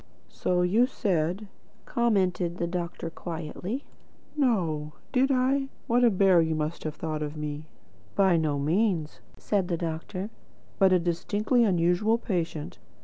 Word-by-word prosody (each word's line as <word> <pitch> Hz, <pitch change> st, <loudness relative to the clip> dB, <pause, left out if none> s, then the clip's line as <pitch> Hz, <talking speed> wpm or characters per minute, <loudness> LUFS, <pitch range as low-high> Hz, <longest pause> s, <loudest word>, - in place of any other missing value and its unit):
"So 180 Hz, -1 st, 0 dB
you 220 Hz, +8 st, +4 dB
said," 185 Hz, -2 st, -1 dB, 0.4 s
commented 185 Hz, -7 st, +1 dB
the 170 Hz, -, -1 dB
doctor 170 Hz, -1 st, -4 dB
quietly. 170 Hz, -, -5 dB, 0.5 s
"No! 170 Hz, -, 0 dB, 0.2 s
Did 265 Hz, +1 st, +3 dB
I? 270 Hz, +1 st, +2 dB, 0.2 s
What 245 Hz, +1 st, +3 dB
a 240 Hz, -, +7 dB
bear 190 Hz, -3 st, +5 dB
you 160 Hz, -1 st, 0 dB
must 155 Hz, +2 st, -3 dB
have 155 Hz, -1 st, -3 dB
thought 155 Hz, -1 st, -3 dB, 0.2 s
me." 150 Hz, 0 st, -4 dB, 0.5 s
"By 190 Hz, -3 st, +4 dB
no 155 Hz, -3 st, +1 dB
means," 165 Hz, +1 st, 0 dB, 0.2 s
said 195 Hz, -4 st, 0 dB
the 175 Hz, -2 st, -1 dB
doctor, 175 Hz, +5 st, -4 dB, 0.5 s
"but 190 Hz, -2 st, +5 dB
a 185 Hz, -, +6 dB
distinctly 205 Hz, +8 st, +1 dB
unusual 185 Hz, +3 st, +3 dB
patient. 170 Hz, -8 st, -3 dB
180 Hz, 135 wpm, -27 LUFS, 165-215 Hz, 0.5 s, a